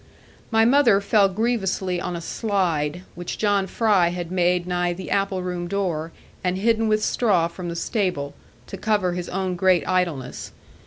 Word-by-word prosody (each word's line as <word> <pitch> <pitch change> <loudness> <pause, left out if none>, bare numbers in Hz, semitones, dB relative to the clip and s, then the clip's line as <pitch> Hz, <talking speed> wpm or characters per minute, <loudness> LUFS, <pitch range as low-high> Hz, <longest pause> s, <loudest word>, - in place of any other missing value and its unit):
My 225 -1 +4
mother 240 -5 +5
fell 200 0 +3
grievously 190 -4 -1
on 180 - -3
a 170 - -5
slide, 180 -5 -1
which 175 0 -6
John 200 -2 +1
Fry 205 -5 +3
had 175 0 -4
made 180 -1 +1
nigh 175 -1 0
the 185 +1 -8
apple 195 -2 0
room 180 -1 -3
door, 170 -4 -2 0.3
and 180 0 0
hidden 225 +2 +2
with 215 0 +1
straw 195 -10 +2
from 175 +1 -7
the 170 - -4
stable, 175 -7 -2 0.3
to 195 - -8
cover 205 -3 +1
his 175 0 -4
own 185 -1 -2
great 185 0 +2
idleness. 170 -9 -2
185 Hz, 165 wpm, -23 LUFS, 175-205 Hz, 0.3 s, mother